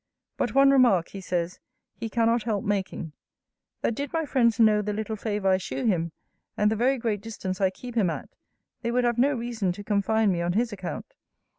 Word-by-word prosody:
But - - -2
one 275 0 +7
remark, 240 -11 +4
he 195 - -8
says, 180 -1 -2 0.3
he 225 0 -5
cannot 230 +1 +2
help 215 -3 -1
making: 190 -5 -2 0.7
that - - +1
did 285 +5 -4
my 325 -1 0
friends 235 -6 +2
know 215 -2 +5
the 210 0 -2
little 220 +1 -3
favour 205 -2 -1
I 185 - +4
shew 135 -7 -4
him, 170 -6 +1 0.5
and 210 0 +3
the - - +1
very 255 +5 +2
great 225 -4 -1
distance 200 -4 -5
I 190 - +4
keep 245 +6 -9
him 215 -6 +2
at, - - -5 0.5
they 235 - -2
would 245 +1 +1
have 240 -1 +1
no 280 +3 +3
reason 230 -5 -2
to 205 - -9
confine 210 +1 +2
me 175 -2 -1
on 175 +1 0
his 230 +2 0
account. 185 -3 -6
215 Hz, 205 wpm, -26 LUFS, 190-235 Hz, 0.7 s, one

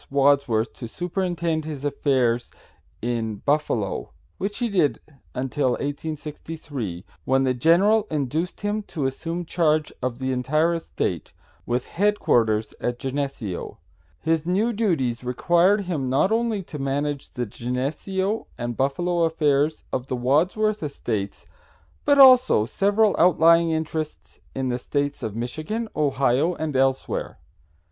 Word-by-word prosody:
Wadsworth 140 -5 +2
to 120 - -6
superintend 170 - -2
his 150 -2 -6
affairs 130 -4 +1 0.5
in 115 -2 -1
Buffalo, 125 -5 -1 0.3
which 205 +2 -3
he 240 - 0
did 180 -9 +1 0.4
until 130 0 0
1863, 145 - -5 0.2
when 135 +1 +3
the 130 -1 +2
general 195 - +4
induced 155 +4 -2
him 205 +1 -1
to 160 -8 -4
assume 165 +6 -3
charge 155 -2 +1
of 125 -1 -2
the 130 0 -2
entire 155 +7 +1
estate, 165 -1 -3 0.3
with 120 +1 0
headquarters 115 - +1
at 120 0 -1
Geneseo. 135 -8 -4 0.4
His 160 -1 0
new 200 +7 +1
duties 150 - 0
required 175 - +3
him 160 -9 -2
not 140 +10 +2
only 225 -3 0
to 150 -3 -8
manage 140 +1 -2
the 125 -1 -2
Geneseo 150 - -2
and 120 -1 -3
Buffalo 170 +7 0
affairs 150 -1 +1
of 130 0 -2
the 130 - -2
Wadsworth 180 - +1
estates, 110 -9 -4 0.6
but 285 -1 +4
also 255 - +7
several 205 - +2
outlying 170 -1 +5
interests 160 -1 -4 0.2
in 130 -1 -1
the 125 0 -1
States 145 +2 -2
of 110 -2 -4
Michigan, 155 - -3
Ohio 140 +2 +2
and 155 -3 -3
elsewhere. 135 0 0
145 Hz, 125 wpm, -24 LUFS, 130-175 Hz, 0.6 s, also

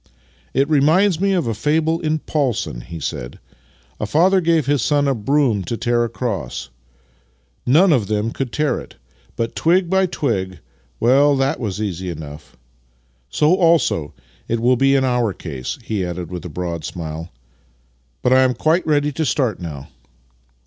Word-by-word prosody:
" 60 -1 -34
It 135 +1 +3
reminds 160 +5 +3
me 195 0 +2
of 180 -3 +1
a 115 - -1
fable 155 +8 +1
in 155 -2 0
Paulson," 135 - -2
he 85 +5 -8
said. - - -5 0.3
" 65 -1 -34
A 105 - -2
father 185 - +3
gave 165 -4 +2
his 140 -2 +1
son 145 +2 +2
a 135 - +2
broom 120 -3 +1
to 115 - -3
tear 120 0 +1
across. 115 - -4 1.0
None 165 +7 +5
of 115 -8 +1
them 105 +1 -1
could 130 -1 -4
tear 150 +3 0
it: - - -12 0.4
but, 115 0 -3
twig 175 +2 +2
by 190 0 +3
twig 95 - -2 0.2
— - - -38
well, 140 +4 +4
that 135 +3 0
was 105 -5 -3
easy 95 -4 -3
enough. 75 -2 -9 0.7
So 150 +3 +3
also 165 - +2 0.3
it 115 - -1
will 125 +2 +3
be 135 +2 +3
in 135 - +3
our 120 -5 +1
case," 70 -9 -6
he 105 -4 -2
added 90 -1 -5
with 90 -1 -6
a - - -5
broad 85 0 -4
smile. 80 -1 -6 0.5
" - - -41
But 125 - +4
I 130 - +6
am 130 -1 +2
quite 160 +8 +1
ready 150 -1 +2
to 160 +3 -2
start 130 - 0
now." 75 -6 -7
120 Hz, 175 wpm, -20 LUFS, 90-150 Hz, 1.0 s, I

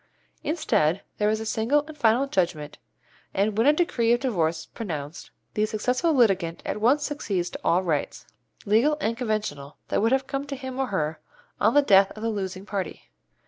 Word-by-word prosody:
Instead 210 - +1 0.2
there 210 0 +3
is 215 0 0
a 220 - -5
single 235 +7 +1
and 310 0 -10
final 245 0 +3
judgment, 170 - -2 0.6
and 200 +2 +1
when 225 +5 +3
a - - +8
decree 280 -9 +1
of 240 - +2
divorce 170 -11 0
is - - -11
pronounced 155 -7 -6 0.2
the 210 - +1
successful 250 +9 0
litigant 195 - +2
at 210 - -3
once 275 +6 +3
succeeds 190 -11 -2
to - - -7
all 180 +2 +2
rights, 155 -5 -2 0.4
legal 235 +9 +3
and 230 -4 -1
conventional, 215 - -3
that - - +1
would 225 +2 +2
have 265 0 +2
come 275 +1 -4
to 280 - -4
him 260 -1 -6
or 265 - +1
her 160 -7 -2 0.4
on - - +3
the 290 - +6
death 195 -5 +6
of 215 - -8
the 230 - 0
losing 190 -2 -4
party. 200 -4 -5
215 Hz, 190 wpm, -25 LUFS, 185-260 Hz, 0.6 s, a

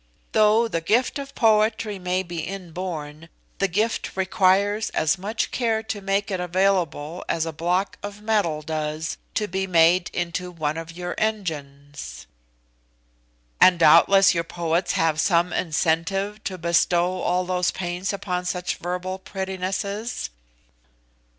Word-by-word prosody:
Though 220 +2 +4
the 165 -7 -2
gift 235 - +1
of 275 0 -8
poetry 215 -2 +2
may 180 +1 -1
be 170 -2 -6
inborn, 170 -3 -6 0.3
the 195 - +3
gift 210 +3 -1
requires 195 +3 +2
as 160 +4 +2
much 210 +5 -2
care 225 -3 0
to 210 -2 -5
make 195 +1 0
it 190 - -1
available 180 -3 0
as 165 -1 0
a 165 - -4
block 180 +5 -1
of 205 0 -7
metal 205 -8 0
does 155 +1 -3 0.2
to 210 - 0
be 190 +1 -2
made 175 +1 +4
into 180 +1 -3
one 155 -3 -2
of 165 0 -6
your 175 +1 -5
engines." 145 - -4 1.4
"And 180 -1 +7
doubtless 175 +5 +6
your 170 -1 0
poets 170 +1 -1
have 160 -1 +2
some 175 0 +2
incentive 185 +6 0
to 190 -1 -3
bestow 175 +2 +1
all 180 +1 +1
those 180 0 +1
pains 180 +1 -3
upon 180 -3 -3
such 180 0 -2
verbal 180 +2 -4
prettinesses?" 190 - -4
180 Hz, 135 wpm, -24 LUFS, 165-200 Hz, 1.4 s, And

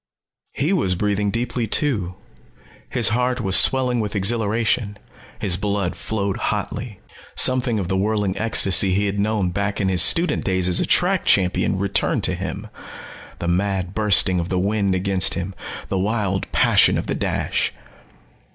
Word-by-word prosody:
He 155 +7 0
was 95 - 0
breathing 105 +2 -1
deeply 120 +1 -2
too. 105 - -1 0.7
His - - +2
heart 125 +2 0
was 95 -5 +1
swelling 125 -2 +2
with 105 -1 -3
exhilaration. 110 +1 0 0.4
His 90 -3 -1
blood 100 -2 -2
flowed 100 -3 -3
hotly. 110 -6 -4 0.4
Something 125 -3 +2
of 95 -4 -3
the 95 - -1
whirling 100 0 -1
ecstasy 95 -4 +3
he 100 +1 +1
had 100 0 -2
known 105 -3 0
back 100 +2 -2
in 95 -2 0
his 90 -2 +4
student 170 - +3
days 95 -2 0
as 90 - +3
a - - -1
track - - +2
champion 95 0 +1
returned 100 +1 -1
to - - +2
him - - -5 0.7
the 85 - -5
mad 95 0 -1
bursting 100 -4 +3
of 85 +1 -4
the 95 - -1
wind 100 0 0
against 95 0 +2
him, 95 +2 -4 0.4
the 95 - -1
wild 100 -1 -2
passion - - +3
of - - -3
the - - -3
dash. - - -2
100 Hz, 160 wpm, -21 LUFS, 95-110 Hz, 0.7 s, his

